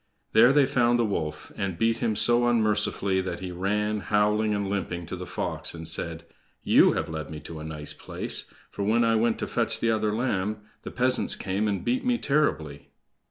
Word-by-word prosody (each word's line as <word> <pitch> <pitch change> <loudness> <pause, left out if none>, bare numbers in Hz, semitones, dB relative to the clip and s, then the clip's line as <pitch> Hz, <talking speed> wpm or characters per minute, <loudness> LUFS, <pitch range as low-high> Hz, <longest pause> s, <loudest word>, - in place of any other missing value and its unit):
There 115 +4 +6
they 145 -1 +5
found 120 -3 +2
the 120 - +2
wolf, 80 -7 -3
and 95 -3 -3
beat 115 +4 +2
him 115 -2 0
so 120 +3 +3
unmercifully 105 -4 +1
that 90 -2 -4
he 95 -1 -5
ran, 105 +4 -1
howling 105 +1 +1
and 100 -1 -1
limping, 90 -3 -3
to 90 - -5
the 90 0 -7
fox, - - -3
and 80 -1 -6
said: 80 0 -3 0.4
"You - - +5
have - - -2
led 80 -1 -5
me 80 -1 -7
to 80 +1 -8
a - - -7
nice 75 -1 -6
place, - - -4 0.2
for, - - -6
when 110 +4 +2
I 115 0 +3
went 115 +1 +2
to - - -2
fetch - - 0
the 115 - +2
other 110 -1 +1
lamb, 105 -2 -1 0.2
the - - -7
peasants 125 0 +1
came 100 +2 -1
and 100 -3 -2
beat 125 +2 0
me 250 -1 +2
terribly!" 80 - -1
105 Hz, 205 wpm, -26 LUFS, 90-115 Hz, 0.4 s, There